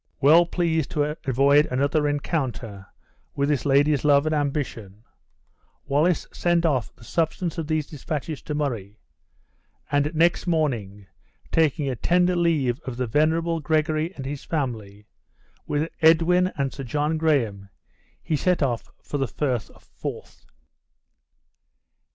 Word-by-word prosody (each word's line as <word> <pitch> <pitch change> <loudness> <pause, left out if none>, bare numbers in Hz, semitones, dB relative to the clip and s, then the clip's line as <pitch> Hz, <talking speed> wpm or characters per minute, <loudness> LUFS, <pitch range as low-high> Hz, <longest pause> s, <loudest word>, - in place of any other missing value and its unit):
Well 160 +5 +6
pleased 165 -4 0
to 150 +1 +1
avoid 140 +4 +4
another 140 +4 +1
rencounter 130 - -3 0.5
with 140 +1 0
this 145 -2 0
lady's 145 +1 +3
love 145 0 +4
and 155 - 0
ambition, 135 -9 -3 0.8
Wallace 150 +5 +1
sent 175 -1 +1
off 135 -8 0
the - - -18
substance 165 +5 -2
of 160 - -4
these 155 -2 0
dispatches 150 +1 -5
to 150 - -5
Murray; 115 -9 -3 0.9
and 145 +1 +2
next 170 +3 +2
morning, 115 - -1 0.5
taking 155 -2 +2
a 130 - -1
tender 180 +7 +2
leave 150 -8 +1
of 130 -6 -7
the 125 - -1
venerable 160 +6 +1
Gregory 155 +2 0
and 135 - -7
his 140 +1 -5
family, 110 -9 -4 0.6
with 150 +2 0
Edwin 170 +3 +4
and 135 -1 -1
Sir 135 - -6
John 150 +5 -1
Graham, 115 -11 0 0.5
he 160 - -1
set 175 +2 +1
off 120 -4 -2
for 145 - -4
the 135 - 0
Frith 125 -9 -2
of - - -20
Forth. - - -8
145 Hz, 135 wpm, -24 LUFS, 130-160 Hz, 0.9 s, Well